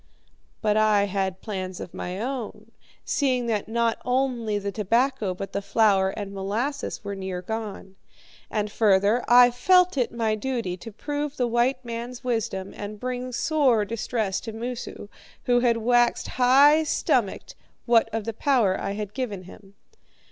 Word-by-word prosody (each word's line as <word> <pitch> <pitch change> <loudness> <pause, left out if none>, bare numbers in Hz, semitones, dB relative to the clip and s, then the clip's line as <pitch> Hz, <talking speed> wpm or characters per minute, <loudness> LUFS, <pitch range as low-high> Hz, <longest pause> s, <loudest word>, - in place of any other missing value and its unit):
"But 210 -1 +2
I 215 -2 +4
had 190 -2 -2
plans 185 -4 -5
of - - -8
my 180 +2 -5
own, 230 -3 -5 0.3
seeing 255 -4 +1
that 220 -3 -1
not 230 0 0
only 250 -4 0
the 200 0 -3
tobacco 220 0 0
but 195 +1 -7
the 200 - -1
flour 200 -1 +3
and 200 0 -6
molasses 220 +11 -3
were 200 -1 -4
near 190 -2 -5
gone. 210 -3 -6 0.5
And 210 -1 -2
further, 205 +2 +3
I 245 0 +7
felt 360 +6 +3
it 245 - 0
my 225 -2 0
duty 230 -5 -2
to 225 +5 -10
prove 290 +5 -4
the 250 - +1
white 240 +2 +1
man's 235 +1 -6
wisdom 220 -6 -2
and 205 0 -7
bring 255 +1 -4
sore 255 -5 +2
distress 220 -2 -2
to 225 - -7
Moosu, 235 -2 -6 0.4
who 245 -1 +3
had 240 -1 +2
waxed 240 +1 +2
high 275 +5 +5
stomached, 310 - 0 0.3
what 230 -2 +4
of 225 -1 -2
the 225 - -3
power 230 -6 +2
I 200 - -2
had 210 0 -5
given 215 -8 -4
him. 195 +2 -15
225 Hz, 155 wpm, -25 LUFS, 200-250 Hz, 0.5 s, I